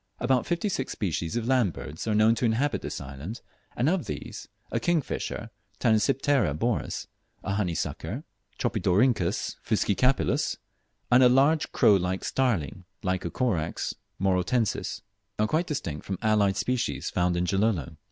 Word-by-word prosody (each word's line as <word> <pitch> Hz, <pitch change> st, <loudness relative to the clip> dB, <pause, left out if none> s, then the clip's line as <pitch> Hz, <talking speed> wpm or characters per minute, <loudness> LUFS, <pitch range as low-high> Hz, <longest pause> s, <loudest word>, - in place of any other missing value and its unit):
About 125 Hz, 0 st, +1 dB
fifty 175 Hz, +4 st, 0 dB
six 135 Hz, -9 st, -2 dB
species 85 Hz, -4 st, -2 dB
of 120 Hz, -2 st, -1 dB
land 125 Hz, -9 st, +3 dB
birds 80 Hz, +8 st, -7 dB
are 110 Hz, -, +1 dB
known 110 Hz, +1 st, +5 dB
to 115 Hz, -, -3 dB
inhabit 120 Hz, +6 st, +1 dB
this -, -, -5 dB
island, 70 Hz, -, -7 dB, 0.3 s
and 125 Hz, -, +1 dB
of 175 Hz, 0 st, +1 dB
these, 75 Hz, -2 st, -6 dB, 0.2 s
a -, -, 0 dB
kingfisher 160 Hz, -8 st, -1 dB, 0.3 s
(Tanysiptera 115 Hz, -, +2 dB
Boris), 115 Hz, +5 st, -1 dB, 0.4 s
a 100 Hz, -, -2 dB
honey 95 Hz, -5 st, 0 dB
sucker -, -, -4 dB, 0.3 s
(Tropidorhynchus 100 Hz, -1 st, +1 dB
fuscicapillus), 115 Hz, +4 st, +1 dB, 0.5 s
and 125 Hz, +1 st, +7 dB
a 125 Hz, -, +7 dB
large 140 Hz, +5 st, +3 dB
crow 100 Hz, -, +5 dB
like 90 Hz, +1 st, -2 dB
starling 105 Hz, -, 0 dB, 0.2 s
(Lycocorax 90 Hz, -1 st, -1 dB, 0.3 s
morotensis), 95 Hz, +4 st, 0 dB, 0.4 s
are 105 Hz, -, +2 dB
quite 160 Hz, +10 st, 0 dB
distinct 85 Hz, -, -4 dB
from 95 Hz, -, -2 dB
allied 105 Hz, -3 st, +3 dB
species 125 Hz, +3 st, -1 dB
found 90 Hz, -1 st, +1 dB
in 90 Hz, -, +1 dB
Gilolo. 95 Hz, -, 0 dB
110 Hz, 140 wpm, -27 LUFS, 90-125 Hz, 0.5 s, and